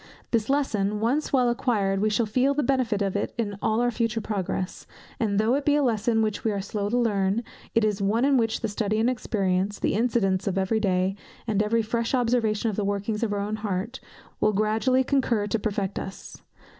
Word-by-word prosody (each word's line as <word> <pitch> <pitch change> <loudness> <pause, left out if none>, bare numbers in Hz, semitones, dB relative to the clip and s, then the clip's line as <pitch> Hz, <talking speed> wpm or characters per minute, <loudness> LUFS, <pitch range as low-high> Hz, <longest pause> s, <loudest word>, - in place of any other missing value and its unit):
This 225 -1 +1
lesson 210 -8 0
once 250 +8 0
well 255 -3 +3
acquired, 210 -5 +1
we 215 +2 +2
shall 225 +2 +1
feel 255 +6 +1
the 295 - +1
benefit 240 -6 +1
of 195 -1 -2
it 205 - -2
in 210 -4 -2
all 220 +2 +1
our 245 0 +2
future 230 -1 -1
progress; 190 -3 -3 0.3
and 210 -4 0
though 220 +3 +3
it 280 +1 +1
be 290 0 +3
a 295 - +2
lesson 225 -2 +1
which 215 -2 -2
we 220 - +1
are 200 - -2
slow 200 +1 -3
to 240 - +1
learn, 205 -2 +1 0.3
it 230 - +4
is 210 -1 0
one 220 +6 +2
in 280 0 +4
which 225 -3 +1
study 215 0 -1
and 235 +3 +3
experience, 200 -4 -1
the - - 0
incidents 205 -4 +1
of 195 -1 0
every 195 +3 +1
day, 190 -2 +1 0.3
and 210 -3 +1
every 225 +2 +1
fresh 230 +3 -1
observation 230 -3 +1
of 200 - -7
the 210 - 0
workings 205 +2 -2
of 230 -3 0
our 205 -1 -1
own 210 +2 -2
hearts, 210 +4 -3 0.4
will 215 - +2
gradually 220 +5 +2
concur 255 -6 +1
to 210 +2 -1
perfect 200 -2 -2
us. 190 - -9
215 Hz, 210 wpm, -26 LUFS, 200-235 Hz, 0.4 s, it